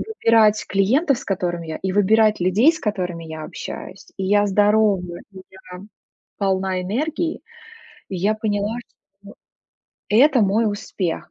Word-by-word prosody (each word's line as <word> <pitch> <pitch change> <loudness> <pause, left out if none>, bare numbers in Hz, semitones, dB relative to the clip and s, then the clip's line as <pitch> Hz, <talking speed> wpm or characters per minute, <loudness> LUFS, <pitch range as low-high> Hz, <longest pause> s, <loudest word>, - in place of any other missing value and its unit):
выбирать 225 - +2
клиентов, 245 - +2
с - - -10
которыми 175 -3 -3
я, 160 - -4
и 190 - -1
выбирать 215 +2 +3
людей, 200 - +4
с 315 - -8
которыми 180 - -3
я 160 -1 -8
общаюсь. 190 - -8
И 190 - -3
я 205 +2 +3
здорова, 205 -1 +3 0.3
и 190 - -11
я 185 -1 -12 0.6
полна 190 -2 0
энергии, 310 - -2 0.7
и 190 - -3
я 200 +5 +1
поняла, 215 +1 -2
что 200 -3 -19 0.8
это 255 +4 +4
мой 210 +2 +2
успех. 195 -4 -4
205 Hz, 140 wpm, -21 LUFS, 190-220 Hz, 0.8 s, людей